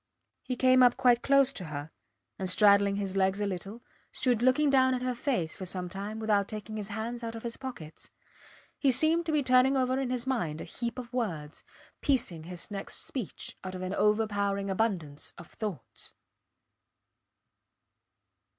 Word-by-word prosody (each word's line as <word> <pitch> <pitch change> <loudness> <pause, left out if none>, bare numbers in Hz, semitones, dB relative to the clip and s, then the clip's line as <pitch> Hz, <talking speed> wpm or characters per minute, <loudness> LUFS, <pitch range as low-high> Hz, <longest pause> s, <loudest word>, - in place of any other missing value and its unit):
He 255 - -3
came 255 +1 +5
up 245 -1 +5
quite 245 -2 +4
close 275 -1 +4
to 185 - -7
her, 150 0 -6 0.5
and 190 -1 -1
straddling 200 0 +5
his 195 -1 -3
legs 190 +1 +2
a 205 - 0
little, 200 +4 -5 0.3
stood 245 -4 +1
looking 270 +4 +4
down 260 -1 +4
at 250 - -4
her 255 0 0
face 240 - -1
for 185 - -6
some 180 0 -4
time 200 +3 -5
without 210 -3 +1
taking 215 0 -7
his 210 -2 -3
hands 225 +3 -4
out 230 0 -4
of 225 - -8
his 235 -1 -4
pockets. 235 - -9 0.7
He 280 - +3
seemed 315 +6 +4
to - - +1
be 300 -2 +2
turning 255 +1 +4
over 260 0 +1
in 265 -2 -1
his 250 -1 -2
mind 175 -13 -1
a - - -5
heap 235 0 -5
of 245 -2 -7
words, 165 -12 -3 0.4
piecing 190 - 0
his 180 +3 -5
next 200 -1 -6
speech 245 -9 -5
out 185 0 -5
of 185 - -5
an 185 +1 -3
overpowering 200 -2 +1
abundance 185 -9 -2
of - - -10
thoughts. 210 -7 -7
220 Hz, 175 wpm, -29 LUFS, 195-255 Hz, 0.7 s, came